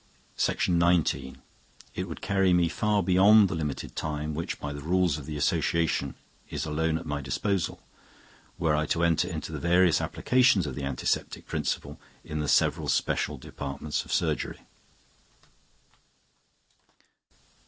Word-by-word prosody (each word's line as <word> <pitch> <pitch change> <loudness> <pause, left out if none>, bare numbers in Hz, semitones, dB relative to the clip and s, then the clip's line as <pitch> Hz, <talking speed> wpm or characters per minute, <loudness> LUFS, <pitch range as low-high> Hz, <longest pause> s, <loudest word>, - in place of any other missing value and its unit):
It 90 +2 -4
would 80 - -7
carry 95 -2 +2
me 85 -1 +3
far 105 +2 +1
beyond 100 +3 +6
the - - -3
limited 75 -4 -4
time 75 0 -3
which, 85 +3 -4
by 75 - -4
the 70 - -7
rules 85 -1 +1
of 70 - -10
the 75 -1 -4
Association, 80 +3 0 0.3
is - - -3
alone 80 +1 0
at 80 - -8
my 75 -1 -3
disposal, 90 +8 -1 0.8
were 80 -3 +1
I 75 0 0
to 85 +1 0
enter 85 0 +2
into 80 -3 -5
the 75 - -4
various 85 +1 +3
applications 125 -8 +3
of 70 - -4
the 70 +2 -4
antiseptic 70 -2 -2
principle - - -3 0.2
in 75 - -5
the 75 - -2
several - - +2
special - - 0
departments 70 +2 -4
of - - -11
surgery. - - -1
80 Hz, 135 wpm, -27 LUFS, 75-90 Hz, 0.8 s, beyond